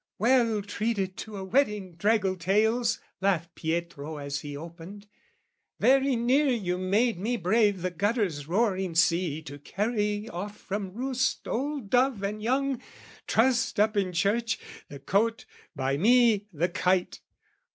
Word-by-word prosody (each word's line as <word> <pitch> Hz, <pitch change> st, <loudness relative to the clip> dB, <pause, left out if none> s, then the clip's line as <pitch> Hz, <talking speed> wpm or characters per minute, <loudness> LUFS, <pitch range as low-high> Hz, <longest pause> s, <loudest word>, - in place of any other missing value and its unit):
" -, -, -65 dB
Well 230 Hz, -2 st, +3 dB
treated 200 Hz, -2 st, -2 dB
to 215 Hz, -2 st, -7 dB
a 190 Hz, -, -5 dB
wetting, 210 Hz, -4 st, 0 dB
draggle 195 Hz, +1 st, +1 dB
tails!" 220 Hz, +7 st, +1 dB, 0.2 s
Laughed 175 Hz, -4 st, 0 dB
Pietro 160 Hz, -2 st, -4 dB
as 140 Hz, 0 st, -4 dB
he 145 Hz, 0 st, -7 dB
opened 170 Hz, +6 st, -10 dB, 0.7 s
"Very 270 Hz, 0 st, +4 dB
near 255 Hz, +5 st, +2 dB
"You 190 Hz, -8 st, 0 dB
made 205 Hz, +3 st, +1 dB
me 235 Hz, +5 st, -1 dB
brave 205 Hz, 0 st, +2 dB
the 185 Hz, -, -1 dB
gutter's 190 Hz, -, -1 dB
roaring 190 Hz, -2 st, 0 dB
sea 170 Hz, -2 st, +2 dB
"To 145 Hz, -2 st, -9 dB
carry 210 Hz, -, -2 dB
off 205 Hz, +2 st, -6 dB
from 195 Hz, -1 st, -5 dB
roost 260 Hz, +1 st, -1 dB
old 275 Hz, -4 st, -3 dB
dove 250 Hz, -4 st, +2 dB
and 210 Hz, +2 st, -3 dB
young, 260 Hz, +2 st, 0 dB, 0.5 s
"Trussed 250 Hz, 0 st, +2 dB
up 215 Hz, +1 st, +3 dB
in 195 Hz, -3 st, +1 dB
church, 220 Hz, +6 st, 0 dB, 0.3 s
the 140 Hz, -, -8 dB
cote, 210 Hz, +11 st, 0 dB, 0.3 s
by 135 Hz, 0 st, -1 dB
me, 225 Hz, -, +4 dB
the 170 Hz, +1 st, 0 dB
kite! 180 Hz, +1 st, 0 dB
205 Hz, 140 wpm, -27 LUFS, 175-235 Hz, 0.7 s, Very